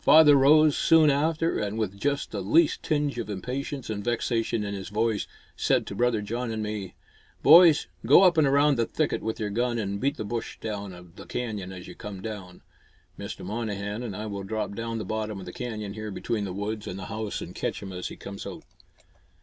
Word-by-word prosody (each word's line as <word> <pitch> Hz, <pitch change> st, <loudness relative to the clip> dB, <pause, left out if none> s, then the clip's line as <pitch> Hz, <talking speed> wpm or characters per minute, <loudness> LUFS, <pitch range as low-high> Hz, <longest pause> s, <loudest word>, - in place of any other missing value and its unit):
Father 155 Hz, -2 st, +8 dB
rose 150 Hz, +2 st, +6 dB
soon 160 Hz, -3 st, +5 dB
after 160 Hz, +3 st, +1 dB
and, 105 Hz, 0 st, -2 dB
with 105 Hz, -3 st, -2 dB
just 140 Hz, +2 st, -1 dB
the 100 Hz, -, -3 dB
least 150 Hz, -, +3 dB
tinge 145 Hz, -4 st, 0 dB
of 115 Hz, -, -4 dB
impatience 130 Hz, +7 st, -4 dB
and 105 Hz, -2 st, -4 dB
vexation 115 Hz, -1 st, 0 dB
in 100 Hz, 0 st, -4 dB
his 95 Hz, -1 st, -6 dB
voice, 110 Hz, +1 st, 0 dB, 0.3 s
said -, -, +1 dB
to -, -, -6 dB
brother 115 Hz, 0 st, +1 dB
John 120 Hz, +4 st, -3 dB
and 110 Hz, -1 st, -3 dB
me, 105 Hz, -3 st, -5 dB, 0.5 s
"Boys, 160 Hz, +1 st, +8 dB, 0.2 s
go -, -, +7 dB
up 180 Hz, -2 st, +6 dB
and 155 Hz, -3 st, +4 dB
around 140 Hz, 0 st, +4 dB
the 115 Hz, -, +2 dB
thicket 155 Hz, -2 st, -1 dB
with 110 Hz, 0 st, -3 dB
your 105 Hz, -2 st, -2 dB
gun 120 Hz, +2 st, 0 dB
and 100 Hz, -2 st, -2 dB
beat 140 Hz, +3 st, 0 dB
the 110 Hz, -, -4 dB
bush 115 Hz, +2 st, -4 dB
down 100 Hz, -5 st, -6 dB
the -, -, -10 dB
canyon 105 Hz, -6 st, -4 dB
as 90 Hz, -2 st, -9 dB
you 90 Hz, -, -9 dB
come 100 Hz, +1 st, -8 dB
down. 95 Hz, -3 st, -7 dB, 0.6 s
Mr. -, -, -6 dB
Monnehan 105 Hz, 0 st, -3 dB
and 115 Hz, -6 st, -5 dB
I 105 Hz, -, -5 dB
will 100 Hz, -2 st, -4 dB
drop 110 Hz, +1 st, -3 dB
down 115 Hz, +2 st, -4 dB
to 115 Hz, -1 st, -3 dB
the -, -, -9 dB
bottom 110 Hz, 0 st, -3 dB
of 95 Hz, -, -8 dB
the 90 Hz, -, -8 dB
canyon 110 Hz, -5 st, -5 dB
here 110 Hz, 0 st, -6 dB
between 105 Hz, +1 st, -2 dB
the 95 Hz, -, -4 dB
woods 105 Hz, +2 st, -4 dB
and 90 Hz, -, -5 dB
the 95 Hz, -, -6 dB
house 110 Hz, -1 st, -4 dB
and -, -, -7 dB
catch -, -, -3 dB
him 95 Hz, -1 st, -7 dB
as 90 Hz, 0 st, -4 dB
he -, -, -8 dB
comes 100 Hz, 0 st, -8 dB
out." -, -, -8 dB
110 Hz, 220 wpm, -27 LUFS, 100-135 Hz, 0.6 s, Father